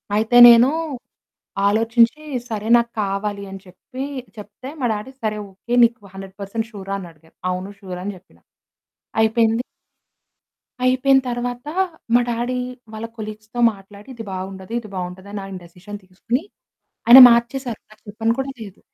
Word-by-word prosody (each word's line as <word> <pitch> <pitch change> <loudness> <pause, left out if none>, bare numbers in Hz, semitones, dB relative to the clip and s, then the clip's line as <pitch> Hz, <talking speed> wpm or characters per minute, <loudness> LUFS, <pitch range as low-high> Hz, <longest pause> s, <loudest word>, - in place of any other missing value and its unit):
అయితే 220 +3 +2
నేనూ 235 +2 +7 1.0
ఆలోచించి, 230 +6 +2 0.3
సరే 215 -1 -4
నాకు 235 0 -1
కావాలి 200 0 -3
అని 195 - -8
చెప్పి 190 +8 -9 0.3
చెప్తే, 210 +5 -10
మా - - 0
డాడీ 210 +5 -6
సరే 215 -1 -1
ఓకె 195 +5 -8
నీకు 235 -1 +2
100% 195 +3 -6
ష్యూ‌ర? 195 -4 -10
అని 185 - -8
అడిగారు. 160 0 -25
అవును 185 +2 -4
ష్యూర్ 185 -3 -7
అని 205 - -4
చెప్పినా. 180 - -24 0.8
అయిపోయింది. 225 +1 +2 1.2
అయిపోయిన 260 +1 +4
తరువాత 245 +1 -4 0.5
మా 245 - +6
డాడీ 240 +2 -2 0.4
వాళ్ళ 220 +1 -5
కొలీగ్స్‌తో 215 +2 -8
మాట్లాడి 200 +3 -15
ఇది 230 - -7
బాగుండదు 190 +2 -7
ఇది 215 -3 -11
బాగుంటది 185 +2 -6
అని 205 - -4
ఆయన 195 -1 -7
డిసిషన్ 195 +4 -11
తీసుకొని 210 +8 -3 0.7
ఆయన 240 +3 +11
మార్చేసారు! 235 0 0
నాకు 215 0 -20
చెప్పను 225 +2 -1
కూడా 270 0 -2
లేదు! 205 -3 -10
215 Hz, 140 wpm, -21 LUFS, 195-235 Hz, 1.2 s, ఆయన